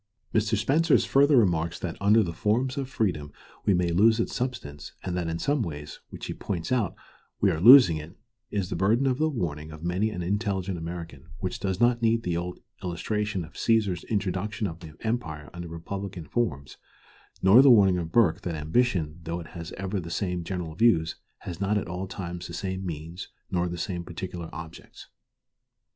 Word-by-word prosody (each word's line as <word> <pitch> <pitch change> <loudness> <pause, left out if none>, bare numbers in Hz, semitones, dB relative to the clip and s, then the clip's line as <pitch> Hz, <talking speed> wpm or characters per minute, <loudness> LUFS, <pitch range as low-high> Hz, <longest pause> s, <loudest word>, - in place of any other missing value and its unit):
Mr. 110 0 +2
Spencer's 150 +9 +3
further 140 +1 +5
remarks 85 -6 +2
that 85 -1 -4
under 105 +3 +5
the 85 -3 -4
forms 115 +9 0
of 135 -3 -3
freedom 80 - -1 0.3
we 100 - +4
may 90 -1 +1
lose 110 +7 +4
its 115 - -1
substance, 75 - -4
and 90 -2 -3
that 90 -2 -1
in 80 0 -2
some 145 - 0
ways, 75 -6 -6
which - - -8
he - - -4
points 85 -1 -4
out, 115 -8 +1 0.4
we 100 - +4
are 80 -2 -2
losing 115 - +9
it, 75 +3 -9 0.3
is 100 -3 -2
the - - -1
burden 105 +9 +2
of 130 0 +1
the 155 0 +2
warning 80 - -3
of 80 +1 -10
many 90 +5 0
an 90 -5 -4
intelligent 95 0 -1
American, 85 -3 -7
which 95 -3 -4
does 95 -2 -2
not 120 0 +3
need 115 0 +2
the 90 -2 -1
old 90 +1 -4 0.2
illustration 95 +2 -2
of 80 - -16
Cæsar's 105 -6 +1
introduction 105 0 -2
of 85 -3 -4
the 80 -3 -11
empire 85 -11 -3
under 85 0 -6
republican 90 +1 -6
forms, 70 - -2 0.7
nor 100 +7 +8
the 135 - +7
warning 100 -6 +6
of 85 -1 -5
Burke, 100 -4 +3
that 85 -5 -3
"ambition, 80 0 0
though 85 +1 -4
it 80 - -9
has 85 -2 -8
ever 95 +1 -3
the 85 -2 -7
same 90 -1 -2
general 85 -2 -4
views, 85 -5 +3 0.3
has 90 +1 -7
not 100 +2 +2
at 105 - -2
all 90 +2 -4
times 90 -2 -6
the 85 - -7
same 95 0 -3
means 85 +1 -6 0.2
nor 90 0 +1
the 85 - -5
same 85 0 -3
particular 85 -1 -6
objects." 80 0 -10
90 Hz, 190 wpm, -27 LUFS, 85-110 Hz, 0.7 s, losing